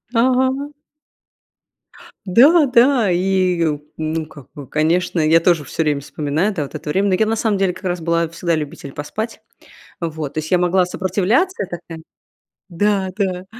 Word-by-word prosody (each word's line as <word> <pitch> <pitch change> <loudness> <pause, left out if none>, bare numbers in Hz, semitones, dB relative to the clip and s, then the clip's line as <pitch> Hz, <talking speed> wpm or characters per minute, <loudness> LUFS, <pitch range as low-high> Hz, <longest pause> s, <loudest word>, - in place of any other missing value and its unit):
Ага. 260 +3 +2 1.6
Да-да, 250 - +5
и, 185 -1 +1 0.3
ну, 160 0 -2
как 145 -3 -14
бы, 145 -3 -10
конечно, 170 +5 0
я 160 +1 +4
тоже 165 -2 +2
всё 155 +4 -2
время 145 -2 0
вспоминаю, 155 +8 -2
да, 160 - -2
вот 140 - -9
это 150 - -6
время, 195 +6 +1
но 185 - +3
я 220 - +2
на 220 +1 0
самом 215 -3 0
деле 190 -2 +1
как 185 +2 -12
раз 175 -1 -2
была 170 0 +1
всегда 170 +1 -2
любитель 150 -2 -6
поспать. 215 +12 -5 0.6
Вот, 160 -4 -4
то - - -11
есть 155 0 -5
я 180 - +5
могла 180 +1 +2
сопротивляться, 200 - 0
я - - -3
такая 170 -2 -8 0.7
Да-да. 190 -1 -1
180 Hz, 160 wpm, -19 LUFS, 160-205 Hz, 1.6 s, Да-да